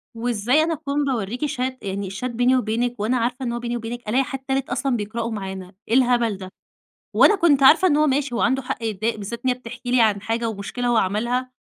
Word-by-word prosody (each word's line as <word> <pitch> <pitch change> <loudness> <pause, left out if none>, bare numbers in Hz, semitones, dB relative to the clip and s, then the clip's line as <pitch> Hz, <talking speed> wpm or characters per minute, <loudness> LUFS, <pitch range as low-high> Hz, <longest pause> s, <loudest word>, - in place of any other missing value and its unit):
وإزاي 240 +5 +1
أنا 330 0 0
أكون 285 -1 -2
باورِّيكِ 245 +2 -2
Chat 260 -2 -2
يعني 195 -1 -4
الChat 210 +6 -5
بيني 245 +1 +2
وبينك 240 0 -1
وأنا 235 +5 +1
عارفة 250 +3 -2
إن 235 - -1
هو 240 - -3
بيني 240 0 -3
وبينك، 235 -1 -6
ألاقي 260 +4 +3
حد 270 0 -5
تالت 265 0 -2
أصلًا 255 +1 0
بيقرأه 225 +2 -3
معانا 190 -3 -6
إيه 230 - -2
الهبل 240 -5 +3
ده؟ 185 -1 -9 0.6
وأنا 420 - +6
كنت 290 -7 +3
عارفة 330 +7 +7
إن 295 - +3
هو 305 0 +3
ماشي 270 -2 0
هو - - -1
عنده 265 +2 +2
حق 235 -2 -5
يتضايق 220 +1 -1
بالذات 215 +3 -6
إن - - +3
هي 250 - +1
بتحكي 245 0 -7
لي 250 -2 +4
عن 205 -3 +2
حاجة 230 +1 -1
ومُشكلة 220 +4 -4
هو 240 -1 +3
عملها، 235 +6 0
240 Hz, 225 wpm, -22 LUFS, 220-260 Hz, 0.6 s, عارفة